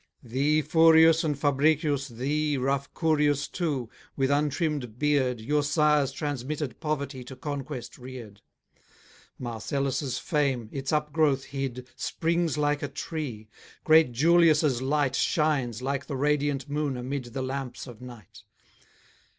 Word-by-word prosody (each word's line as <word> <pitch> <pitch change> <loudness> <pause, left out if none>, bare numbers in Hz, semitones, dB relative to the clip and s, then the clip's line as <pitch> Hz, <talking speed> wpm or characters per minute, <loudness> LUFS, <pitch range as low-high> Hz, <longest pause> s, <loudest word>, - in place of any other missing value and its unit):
Thee, 140 +6 +1
Furius, 160 +1 +6
and 150 -3 -1
Fabricius, 145 0 +1
thee, 145 +4 -1
Rough 135 +1 -1
Curius 150 -3 +2
too, 145 -9 -2 0.3
with 135 0 +1
untrimm'd 145 -4 -1
beard, 135 -4 +1
Your 145 +7 +1
sires' 150 -1 +2
transmitted 145 0 -4
poverty 140 -4 -3
To 130 +2 -10
conquest 135 -3 -6
rear'd. 120 -5 -10 1.0
Marcellus' 135 +3 -2
fame, 135 -7 -1
its 135 +1 -3
up 150 -1 0
growth 145 -4 +2
hid, 130 -2 -5
Springs 165 -1 -1
like 145 0 +1
a 145 - -2
tree; 135 -10 -5 0.4
great 155 -4 +5
Julius' 155 -1 +4
light 135 0 +1
Shines, 135 -7 0
like 140 +1 -2
the 140 - -3
radiant 145 0 0
moon 145 -2 -2
amid 130 +1 -4
The 125 +2 -5
lamps 130 -3 -5
of 120 -4 -12
night. 120 -7 -12
140 Hz, 125 wpm, -27 LUFS, 130-150 Hz, 1.0 s, Furius